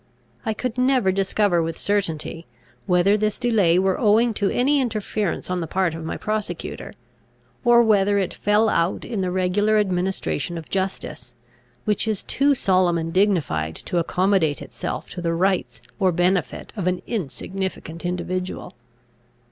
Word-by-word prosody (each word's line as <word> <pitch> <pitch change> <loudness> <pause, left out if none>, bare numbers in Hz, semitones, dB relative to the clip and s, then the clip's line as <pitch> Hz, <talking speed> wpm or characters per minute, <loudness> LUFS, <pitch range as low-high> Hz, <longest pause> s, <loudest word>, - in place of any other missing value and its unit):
I 220 - 0
could 250 +1 -3
never 250 -6 +3
discover 195 -1 +1
with 165 0 -3
certainty, 170 -5 -2 0.4
whether 180 +3 +4
this 215 0 0
delay 210 -9 +3
were 190 0 +1
owing 225 +1 +4
to 200 -2 0
any 280 +3 +2
interference 215 -5 -2
on 180 -1 -2
the 165 - -3
part 185 0 0
of 165 0 -6
my 160 - -4
prosecutor, 215 0 -4 0.7
or 240 -1 +6
whether 205 -2 +3
it 190 -3 -1
fell 210 +2 +2
out 170 -4 0
in 220 -5 -3
the 185 - 0
regular 190 +4 +2
administration 185 -3 -1
of 165 - -8
justice, 185 -10 -4 0.5
which 210 +1 +1
is 215 -3 -1
too 280 +1 +2
solemn 185 -6 +2
and 165 0 -3
dignified 150 - +1
to 175 - -2
accommodate 180 -3 +1
itself - - -5
to 180 - -6
the 165 -1 0
rights 190 +2 0 0.2
or 190 -2 +3
benefit 175 -2 0
of 190 -4 -2
an 180 0 -1
insignificant 185 - -4
individual. 180 +1 -3
190 Hz, 150 wpm, -23 LUFS, 175-210 Hz, 0.7 s, or